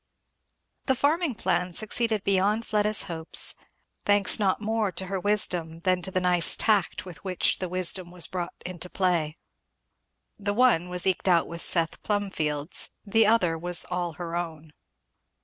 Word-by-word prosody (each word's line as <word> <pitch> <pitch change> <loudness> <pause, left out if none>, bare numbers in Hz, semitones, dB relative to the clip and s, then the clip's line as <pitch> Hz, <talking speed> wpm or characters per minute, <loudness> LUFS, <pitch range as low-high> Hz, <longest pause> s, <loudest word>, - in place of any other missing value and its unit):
The 265 - +3
farming 295 +1 0
plan 180 -3 -1
succeeded 220 +1 -1
beyond 200 +3 +1
Fleda's 210 -1 +1
hopes; 160 -1 +1 0.5
thanks 205 +2 +3
not 195 -3 +1
more 220 -1 -1
to 190 - -4
her 190 0 -3
wisdom 175 -5 0
than 185 0 +1
to 175 - -4
the 185 - -1
nice 180 -2 +3
tact 205 -5 +1
with 180 -4 -11
which 185 -2 +1
the 185 - -4
wisdom 185 0 +1
was 175 -1 +2
brought 175 -2 -5
into 180 0 -6
play. 170 -5 -1 1.0
The 205 0 -2
one 225 -8 +3
was 180 -1 -2
eked 190 0 0
out 170 -3 +4
with 170 0 -7
Seth 165 -2 +2
Plumfield's; 165 -7 -1 0.2
the 220 +1 +3
other 180 -8 +2
was 175 0 0
all 175 -2 -2
her 170 0 -6
own. 160 -3 -6
185 Hz, 155 wpm, -26 LUFS, 170-205 Hz, 1.0 s, out